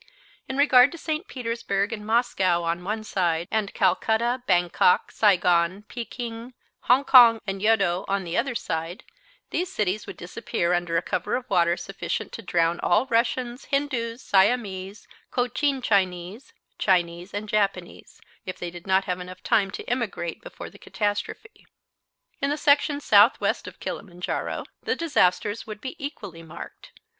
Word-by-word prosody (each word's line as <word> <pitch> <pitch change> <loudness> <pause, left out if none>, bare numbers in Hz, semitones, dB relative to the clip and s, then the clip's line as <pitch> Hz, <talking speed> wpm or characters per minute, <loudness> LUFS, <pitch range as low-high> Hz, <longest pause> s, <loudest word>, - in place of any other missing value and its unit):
In 265 - -3
regard 275 -2 +6
to - - -7
St. 315 +4 -3
Petersburg 230 -4 -2
and 210 -2 -6
Moscow 210 -6 +1
on 170 +1 -2
one 215 +3 -3
side, 175 -5 -1
and 215 -2 0
Calcutta, 225 +6 +1
Bangkok, 175 -1 +3
Saigon, 180 -2 +2
Pekin, 235 +1 -7 0.3
Hong 260 +4 +4
Kong 235 -4 +8
and 195 -1 -4
Yeddo 200 -4 +2
on 195 0 -1
the 170 -1 -5
other 245 +1 0
side, 165 -2 -4 0.5
these 360 +1 -2
cities 210 - -1
would - - -8
disappear 175 0 -2
under 175 -1 0
a 170 - 0
cover 185 -2 -2
of 250 0 -4
water 170 -2 +3
sufficient 195 - -4
to - - -7
drown 170 -3 +1
all 210 +8 +2
Russians, 240 +1 -1
Hindoos, 260 -4 -2
Siamese, 195 -1 +1 0.2
Cochin 260 +2 0
Chinese, 190 +2 -1 0.3
Chinese 175 -1 +1
and 205 +1 -5
Japanese, 195 -4 -2 0.2
if 185 - -6
they 175 -1 -5
did 175 +2 -11
not 190 0 +3
have 180 -1 -6
time 200 -3 +2
to - - -7
emigrate 230 -8 -3
before - - -10
the - - -16
catastrophe. 210 - -4 0.7
In 280 - +1
the 295 - -1
section 290 0 +2
southeast 210 0 +4
of - - -11
Kilimanjaro 180 -3 -4 0.2
the - - -1
disasters 210 - +1
would 215 -1 -7
be 260 +7 -6
equally 190 - -7
marked. 160 -1 -11
205 Hz, 150 wpm, -25 LUFS, 180-245 Hz, 0.7 s, Kong